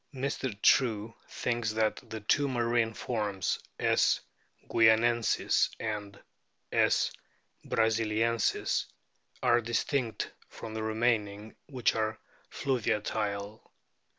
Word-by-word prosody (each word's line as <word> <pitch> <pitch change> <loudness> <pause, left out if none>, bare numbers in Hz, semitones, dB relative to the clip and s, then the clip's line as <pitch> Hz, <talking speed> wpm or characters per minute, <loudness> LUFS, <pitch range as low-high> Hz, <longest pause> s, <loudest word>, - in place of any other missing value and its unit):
Mr. 130 -5 -3
True 115 -4 +3 0.2
thinks 120 -2 -1
that 110 0 +1
the 110 -1 -6
two 140 +7 +2
marine 120 -3 +1
forms 105 -5 -2 0.2
,5. - - +3 0.5
guianensis 115 +1 +3
and 105 -2 -4 0.5
.S. - - +3 0.5
brasiliensis 115 0 +1 0.6
are 120 -1 +4
distinct 120 0 -1 0.2
from 110 - -8
the 110 - -3
remaining, 110 -2 -1
which 130 -4 +1
are 110 0 -1 0.3
fluviatile. 105 -4 -2
110 Hz, 90 wpm, -30 LUFS, 110-120 Hz, 0.6 s, are